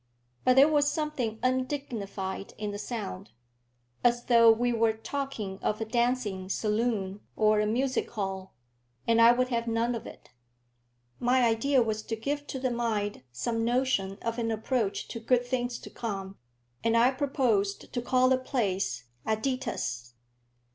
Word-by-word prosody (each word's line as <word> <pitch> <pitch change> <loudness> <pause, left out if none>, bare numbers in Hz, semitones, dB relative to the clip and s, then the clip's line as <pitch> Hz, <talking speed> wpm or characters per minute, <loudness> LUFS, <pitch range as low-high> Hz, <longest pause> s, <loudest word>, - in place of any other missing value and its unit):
But 255 - +4
there 275 +2 +8
was 295 -2 +3
something 300 -8 -2
undignified 250 -8 -2
in 210 -1 -3
the 205 - -5
sound, 210 - -5 0.7
as 240 0 +3
though 230 -2 +7
we 240 +2 +1
were 225 -1 +3
talking 225 -5 -4
of 215 - -1
a 225 - -2
dancing 230 -5 0
saloon 210 -2 -1 0.2
or 215 -1 +3
a 210 - +2
music 255 +4 0
hall, 190 -3 -4 0.5
and 230 0 +4
I 230 +1 +9
would 250 +1 +1
have 235 -1 -1
none 230 +1 +1
of 230 - -5
it. - - -13 0.9
My 250 +1 +3
idea 240 +3 +3
was 220 -1 -2
to 225 - -4
give 285 +6 -3
to - - -4
the 255 -1 -1
mind 220 - -1
some 225 - -2
notion 235 -5 +1
of 230 +1 -2
an 230 -1 0
approach 220 -1 -1
to 230 - -5
good 245 +2 +2
things 245 -1 -2
to - - -11
come, 195 -4 -5 0.5
and 230 0 +3
I 240 +3 +5
proposed 255 -8 0
to 245 - -1
call 255 +1 +3
the 260 0 +3
place 195 - -1 0.2
"Aditus." 220 - -2
230 Hz, 155 wpm, -29 LUFS, 210-255 Hz, 0.9 s, I